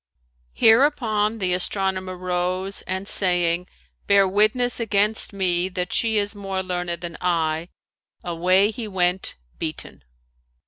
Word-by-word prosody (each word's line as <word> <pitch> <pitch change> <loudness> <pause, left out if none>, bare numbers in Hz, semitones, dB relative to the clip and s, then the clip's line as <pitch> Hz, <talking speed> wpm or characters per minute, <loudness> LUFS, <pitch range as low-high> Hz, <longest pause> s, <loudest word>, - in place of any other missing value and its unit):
Hereupon 225 -3 +3
the 185 -4 0
astronomer 185 0 -1
rose, 185 +2 -1
and 190 +1 -4
saying, 175 -2 +2 0.4
"Bear 200 -1 +5
witness 215 +6 +1
against 215 -1 0
me 185 -2 0
that 180 -1 -4
she 225 -2 +2
is 205 +1 0
more 195 -2 -4
learned 175 -2 -3
than 170 -1 -6
I," 165 -1 -1 0.5
away 185 +4 +2
he 230 -1 -6
went 180 -2 -1 0.2
beaten. 160 -2 -7
190 Hz, 120 wpm, -22 LUFS, 180-205 Hz, 0.5 s, Bear